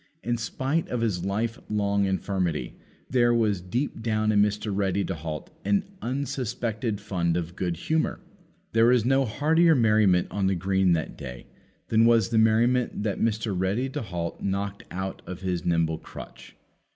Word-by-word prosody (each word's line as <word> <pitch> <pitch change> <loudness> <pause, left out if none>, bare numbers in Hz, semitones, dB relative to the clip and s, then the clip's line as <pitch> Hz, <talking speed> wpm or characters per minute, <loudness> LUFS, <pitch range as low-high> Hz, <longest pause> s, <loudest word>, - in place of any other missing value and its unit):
In 120 +1 0
spite 135 +7 -1
of 125 - -2
his 95 -6 -1
life 115 +5 -1
long 100 -1 +1
infirmity, 95 -7 -1 0.3
there 120 -2 +3
was 105 -5 +1
deep 115 +8 -3
down 110 -1 +1
in 105 -1 +4
Mr. 105 0 0
Ready 100 0 0
to - - -2
halt 80 -2 -6
an 100 0 +2 0.2
unsuspected 120 -4 -2
fund 90 -5 -1
of 85 0 -4
good 90 -3 -2
humour. 160 - 0 0.5
There 115 +1 +4
was 120 -2 +4
no 135 +1 +3
heartier 160 +8 +3
merriment 105 -7 +4
on 100 -1 0
the 95 - +2
green 95 0 +2
that 80 -2 -2
day 60 -1 -8 0.4
than 115 0 +4
was 115 -3 +4
the 115 -2 +2
merriment 115 +1 +2
that 105 -3 -2
Mr. 110 -1 0
Ready 100 +8 0
to - - -4
halt 85 -6 -4
knocked 100 +1 -2
out 95 +1 -4
of 90 0 -7
his 90 -4 -2
nimble 80 -2 +1
crutch. - - -11
105 Hz, 165 wpm, -26 LUFS, 95-115 Hz, 0.5 s, in